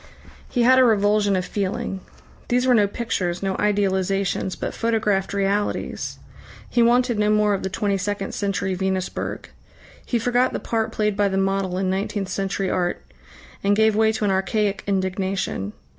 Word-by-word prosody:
He 245 - +1
had 260 +2 +6
a - - +7
revulsion 205 -3 +3
of 185 -1 -1
feeling. 195 0 -3 0.5
These 250 +1 +2
were 255 - +4
no 210 -4 +4
pictures, 195 -5 -2
no 195 -1 0
idealisations, 195 -2 0
but - - -3
photographed 215 -4 0
realities. 200 +1 -1 0.5
He 240 - +1
wanted 240 -1 +3
no 210 0 +2
more 210 -1 +3
of 195 - -1
the 190 - -3
twenty 200 0 -1
second 200 0 -3
century 195 -2 -1
Venusberg. 190 0 -3 0.5
He 240 - -1
forgot 245 +2 +1
the - - -2
part 225 -1 -1
played 210 -1 0
by 205 0 +2
the 190 0 -1
model 195 -1 0
in 185 0 0
nineteenth 195 0 -2
century 195 0 -2
art, 175 -1 -1 0.6
and 200 +1 +3
gave 220 0 +3
way 220 0 +4
to 220 -1 -1
an 200 - +2
archaic 195 +2 0
indignation. 190 - -1
200 Hz, 165 wpm, -23 LUFS, 190-215 Hz, 0.6 s, a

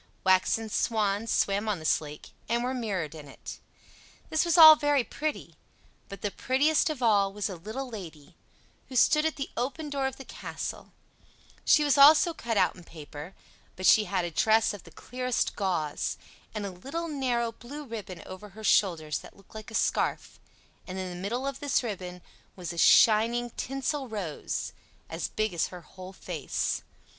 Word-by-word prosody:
Waxen 190 +4 +3
swans 215 0 0
swam 200 +2 +1
on 205 - 0
this 155 -1 +1
lake, 150 -1 -10 0.2
and 235 +1 +1
were 255 +1 -1
mirrored 195 - -3
in 150 -2 -10
it. - - -10 0.7
This 315 - +3
was 340 0 +2
all 315 -1 +12
very 290 -3 +2
pretty; 305 +5 -4 0.6
but 200 -2 -9
the 205 - -1
prettiest 295 - +2
of 285 -5 -4
all 200 -4 +4
was 205 +1 -3
a 190 - -5
little 220 +10 -6
Lady, 170 - -10 0.5
who 260 - -8
stood 305 +5 +4
at 320 - -3
the 275 - -5
open 290 +4 -3
door 275 -1 0
of 265 - -5
the 270 - -11
castle; - - -7 0.7
she 300 - +5
was 290 -1 +3
also 305 +4 +7
cut 230 -7 -3
out - - +3
in 180 - -13
paper, 155 +1 -10 0.4
but 185 - -5
she 215 +2 +6
had 185 -2 -1
a 170 - -4
dress 220 +5 +3
of 205 - -10
the - - -12
clearest 250 +9 -2
gauze, 175 -7 -2 0.4
and 210 -1 -3
a 195 - -4
little 275 - -5
narrow 250 -6 -1
blue 265 +6 -9
ribbon 205 - -7
over 185 +3 -9
her 220 +3 -12
shoulders 165 -7 +2
that - - -14
looked 195 - -20
like 215 0 -9
a 225 - -8
scarf; - - -1 0.5
and 185 0 -6
in 185 -1 -4
the - - -7
middle 240 +7 -2
of 275 - -3
this 285 -2 +1
ribbon 180 -5 -6 0.3
was 175 -2 -6
a - - -10
shining 230 +6 +5
tinsel 270 +2 -3
rose, 200 -9 -4 0.4
as - - -3
big 215 -3 -2
as 170 -1 0
her 180 -1 -10
whole 185 +3 -11
face. 175 -6 -3
215 Hz, 180 wpm, -28 LUFS, 185-265 Hz, 0.7 s, all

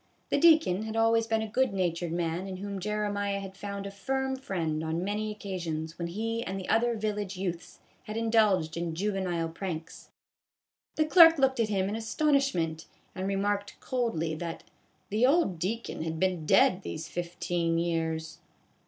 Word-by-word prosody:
The - - +3
deacon 315 - +5
had 220 0 -5
always 225 0 +3
been 225 -1 +1
a - - -3
good 255 +1 +1
natured 175 -3 -1
man 170 +2 -2
in 190 -1 -5
whom 200 0 -5
Jeremiah 205 0 -1
had 195 -1 -8
found 200 0 -5
a 200 - -5
firm 265 +6 -2
friend 165 -11 -2
on 160 +2 -2
many 210 +2 -2
occasions 170 -6 -5
when 170 - -2
he 225 +6 -2
and 195 -2 -4
the 185 - -7
other 235 +1 +3
village 210 -3 -3
youths 180 -2 -4 0.3
had 215 +1 -5
indulged 215 -8 +2
in 170 -1 -3
juve 205 +4 -1
nile 175 -4 -1
pranks. 165 -1 -6 0.9
The 310 - +2
clerk 330 0 +8
looked 265 -2 +2
at 225 -2 +2
him 195 -2 +1
in 205 - -2
astonish 275 +4 +1
ment 160 -2 -2 0.3
and 185 +1 -3
remarked 200 +1 -1
coldly 225 -11 -1
that 165 +1 -5 0.2
" - - -40
the 220 +5 +4
old 275 - +2
deacon 220 +4 -3
had 160 0 -3
been 180 -4 0
dead 185 +1 +5
these 160 -3 -5
fifteen 170 0 -2
years." 160 -2 -2
195 Hz, 175 wpm, -29 LUFS, 170-220 Hz, 0.9 s, clerk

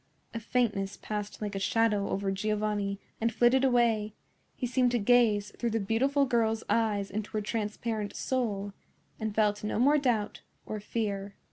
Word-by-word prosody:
A 230 - -3
faintness 220 -4 -1
passed 210 0 -5
like 205 -1 -3
a 195 - -2
shadow 210 +1 +1
over 195 0 -1
Giovanni 205 0 -1 0.2
and 230 +1 +2
flitted 245 +3 +4
away; 230 -5 +2 0.4
he - - -3
seemed 250 0 +2
to - - +3
gaze 220 -2 +3
through 235 - 0
the 225 0 0
beautiful 265 +8 +2
girl's 225 -3 +1
eyes 210 -4 +1
into 210 +1 -3
her 215 - 0
transparent 215 0 -3
soul, 205 -6 -2 0.5
and 220 -1 -3
felt 210 -1 +2
no 210 - -1
more 285 +6 +4
doubt 230 -6 0 0.2
or 215 - -4
fear. 200 -2 -3
215 Hz, 160 wpm, -29 LUFS, 205-235 Hz, 0.5 s, flitted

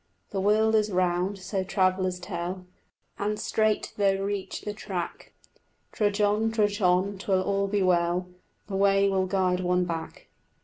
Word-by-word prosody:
The 195 - -1
world 215 +2 +3
is 215 -1 +2
round, 180 +2 0
so 190 0 -3
travellers 185 -1 +1
tell, 180 0 -5 0.5
And 210 +1 -1
straight 215 -1 0
though 200 -2 +3
reach 200 -1 -3
the 210 - -4
track, 185 -4 -5 0.6
Trudge 205 -1 0
on, 210 +2 +2
trudge 210 -1 0
on, 185 +2 +2
'twill 190 -1 +1
all 200 0 0
be 200 0 0
well, 175 0 +2 0.4
The 195 -2 -4
way 195 0 +4
will 190 -1 +1
guide 185 -1 +1
one 180 0 +1
back. 165 -2 -6
195 Hz, 150 wpm, -27 LUFS, 180-205 Hz, 0.6 s, way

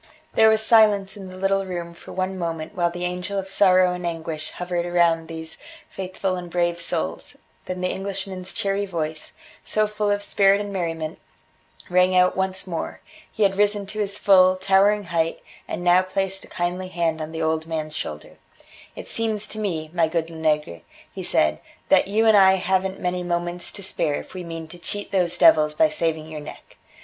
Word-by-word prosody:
There 220 0 +6
was 220 0 +2
silence 210 -4 +4
in 195 -2 -9
the 185 - -10
little 195 +1 +1
room 175 -2 -5
for 170 - -13
one 185 0 -2
moment 165 -3 -4
while 175 -2 +1
the 175 +1 -4
angel 180 +3 -3
of 195 -1 -3
sorrow 185 -2 +4
and 180 0 -6
anguish 160 -2 -4
hovered 175 -1 -3
round 165 -2 +3
these 160 0 -8 0.3
faithful 185 0 -3
and 175 -1 -7
brave 175 0 0
souls, 80 - -3 0.3
then 185 0 -5
the 185 - 0
Englishman's 190 -1 -4
cheery 200 0 -1
voice, 155 -3 -4 0.3
so 215 0 +1
full 210 0 -2
of 205 0 0
spirit 200 0 +3
and 205 -1 -5
merriment, 165 -3 -3 0.7
rang 180 +1 +3
out 180 0 +4
once 190 0 -1
more 170 -3 -5 0.3
he 220 - 0
had 195 -1 +2
risen 205 0 +2
to 215 +2 -7
his 200 -1 -1
full, 185 -2 +5
towering 195 +2 +3
height, 165 0 0 0.2
and 175 - -4
now 180 +1 +5
placed 195 +1 -2
a - - -13
kindly 180 +1 -3
hand 165 -3 -1
on 155 0 -5
the 160 0 -3
old 160 0 0
man's 155 -1 -4
shoulder: - - -6 0.6
"It - - -8
seems 215 -2 -1
to 215 - -5
me, 160 -7 -3
my 170 -2 +3
good 165 0 -2
Lenegre," 150 - -1 0.3
he - - -6
said, 75 0 +2 0.3
"that - - +5
you 215 +3 +2
and 220 -1 +6
I 190 -1 +7
haven't 190 0 0
many 180 0 -1
moments 175 0 -2
to 200 - -8
spare 150 -5 0
if - - -7
we 185 -1 -6
mean 165 -1 -7
to 175 - -12
cheat 205 +3 -5
those 180 -3 +1
devils 150 -2 +5
by 315 - +4
saving 160 - -2
your 155 -1 -7
neck. - - -12
180 Hz, 195 wpm, -23 LUFS, 165-195 Hz, 0.7 s, I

